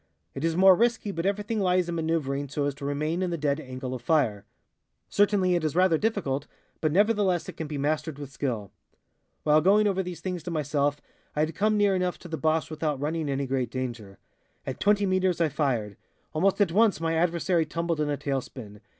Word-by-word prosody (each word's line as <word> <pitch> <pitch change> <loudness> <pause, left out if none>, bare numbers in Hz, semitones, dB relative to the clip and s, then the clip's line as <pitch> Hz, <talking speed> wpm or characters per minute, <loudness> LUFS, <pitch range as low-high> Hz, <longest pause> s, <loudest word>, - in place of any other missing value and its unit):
It 135 - -6
is 165 0 0
more 190 0 +8
risky, 230 -1 +1
but 170 0 -2
everything 210 +2 -1
lies 180 -2 +2
in 170 - -3
maneuvering 155 -4 -1
so 145 +1 -1
as 145 - -1
to 140 +1 -8
remain 155 +5 -1
in 185 - 0
the 170 - -2
dead 145 -1 0
angle 130 -2 -6
of 125 - -5
fire. 120 -8 +1 0.6
Certainly 200 -3 +3
it 175 -2 +1
is 155 0 -1
rather 180 -3 +4
difficult, 160 -11 -1 0.3
but 155 - +1
nevertheless 200 -1 +2
it - - -7
can 160 - -5
be 150 -1 -4
mastered 150 +1 -1
with 145 -2 -8
skill. 120 -7 -3 0.7
"While 155 0 +4
going 205 +5 +4
over 195 -2 +1
these 180 -3 -6
things 180 0 -4
to 175 - -6
myself 145 -2 0 0.3
I 150 - +1
had 155 +1 0
come 215 +1 +1
near 205 -1 +3
enough 180 -1 -1
to - - -11
the 165 - -3
Boche 160 -1 0
without 155 -2 -2
running 155 +1 -2
any 140 0 -1
great 130 -2 -1
danger. 120 -6 -5 0.5
At 130 - -5
20 205 0 +3
meters 185 -2 +1
I 165 -2 +3
fired. 120 -9 -1 0.4
Almost 190 +6 +2
at 200 -5 +3
once 215 +1 +3
my 165 0 0
adversary 170 0 +1
tumbled 165 0 -2
in 150 - 0
a 145 - -1
tail 135 -1 -1
spin. 105 -5 -11
160 Hz, 210 wpm, -27 LUFS, 140-185 Hz, 0.7 s, more